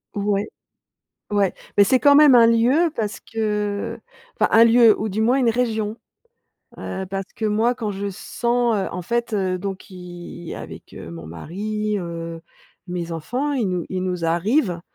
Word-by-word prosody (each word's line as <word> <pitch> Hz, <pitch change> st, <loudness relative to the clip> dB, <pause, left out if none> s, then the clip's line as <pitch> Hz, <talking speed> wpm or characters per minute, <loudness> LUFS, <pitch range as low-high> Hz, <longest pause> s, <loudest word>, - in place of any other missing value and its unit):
ouais, 205 Hz, 0 st, 0 dB, 0.8 s
ouais. 200 Hz, -2 st, +1 dB, 0.2 s
Mais 200 Hz, -, +8 dB
c'est 260 Hz, +6 st, +3 dB
quand 285 Hz, -1 st, +6 dB
même 290 Hz, -3 st, +8 dB
un 230 Hz, -1 st, +7 dB
lieu, 250 Hz, +9 st, +3 dB
parce 210 Hz, -2 st, -3 dB
que, 210 Hz, 0 st, -2 dB, 0.4 s
enfin, -, -, +3 dB
un 225 Hz, +1 st, +8 dB
lieu 230 Hz, -1 st, +6 dB
ou 215 Hz, -, -1 dB
du 210 Hz, +2 st, -1 dB
moins, 245 Hz, +4 st, +3 dB
une 250 Hz, -3 st, +2 dB
région, 220 Hz, -2 st, -1 dB, 0.8 s
heu, 190 Hz, 0 st, -5 dB
parce 195 Hz, 0 st, -5 dB
que, 220 Hz, -, -2 dB
moi, 225 Hz, +4 st, +2 dB
quand 220 Hz, -4 st, -3 dB
je 200 Hz, +1 st, -4 dB
sens, 235 Hz, +4 st, 0 dB
heu, 195 Hz, -, -1 dB
en 180 Hz, -, -4 dB
fait, 235 Hz, +4 st, -2 dB
heu, 190 Hz, -3 st, 0 dB
donc 195 Hz, 0 st, -4 dB
qui 175 Hz, -2 st, -10 dB
avec, -, -, -10 dB
heu, -, -, -8 dB
mon 85 Hz, -2 st, -9 dB
mari, 210 Hz, -, -3 dB
heu, 165 Hz, -2 st, -6 dB, 0.4 s
mes 175 Hz, -2 st, -4 dB
enfants, 250 Hz, -, -2 dB
il 250 Hz, -6 st, 0 dB
nous 180 Hz, -2 st, -2 dB
il 185 Hz, -1 st, -3 dB
nous 180 Hz, -2 st, -2 dB
arrive, 175 Hz, -, +1 dB
210 Hz, 175 wpm, -22 LUFS, 180-230 Hz, 0.8 s, Mais